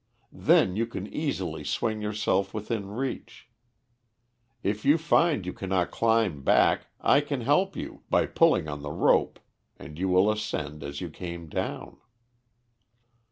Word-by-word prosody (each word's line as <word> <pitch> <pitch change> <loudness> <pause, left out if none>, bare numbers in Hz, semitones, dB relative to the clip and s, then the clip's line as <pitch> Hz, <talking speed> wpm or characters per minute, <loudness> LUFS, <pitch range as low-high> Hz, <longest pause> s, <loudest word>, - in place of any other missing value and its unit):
Then 90 - +3
you 115 +2 0
can 100 -4 -6
easily 140 - -3
swing 110 -1 -2
yourself 105 -2 -1
within 105 -1 -3
reach. 125 +3 -5 1.2
If 105 +2 -1
you 145 +3 +5
find 160 - +2
you 90 - -4
cannot 95 -2 -1
climb 110 -10 +1
back, - - +3
I 140 - +4
can 145 -3 -3
help 180 +11 +2
you, - - -7
by - - +3
pulling 80 - +3
on 75 -1 -5
the 75 - -5
rope - - +2 0.4
and 75 +2 -11
you 95 +1 0
will 95 +3 +4
ascend 75 -8 -4
as 70 0 -6
you 85 -3 -5
came 85 -1 -7
down." - - -4
105 Hz, 145 wpm, -27 LUFS, 90-115 Hz, 1.2 s, you